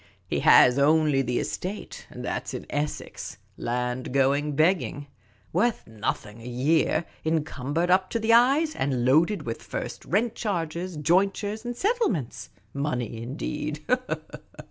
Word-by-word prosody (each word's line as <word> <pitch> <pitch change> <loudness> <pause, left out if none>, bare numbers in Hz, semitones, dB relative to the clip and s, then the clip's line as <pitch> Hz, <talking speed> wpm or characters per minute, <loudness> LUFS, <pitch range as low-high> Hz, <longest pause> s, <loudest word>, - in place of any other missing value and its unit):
He - - -1
has 125 +2 +6
only 150 -1 +4
the 125 -2 -1
estate, 195 +4 -5
and - - -8
that - - -3
'sin - - -5
Essex; 145 +1 -4 0.2
land 125 +1 -2
going 140 +2 +2
begging; 155 -2 +1 0.5
worth 220 +7 +1
nothing 110 0 -4
a 115 - -9
year, 150 +6 +1 0.2
encumbered 160 +1 -1
up 185 0 +3
to 230 - -1
the 225 +1 +3
eyes, 275 +7 +4
and 130 -3 0
loaded 160 +10 +3
with 115 - -5
first - - -5
rent 220 +4 +1
charges, 175 -5 -3
jointures, 195 +7 +1 0.2
settle 460 - +2
ments. 150 - -4 0.2
Money, 125 -5 -2
indeed 150 +4 -4
155 Hz, 130 wpm, -26 LUFS, 130-190 Hz, 0.5 s, has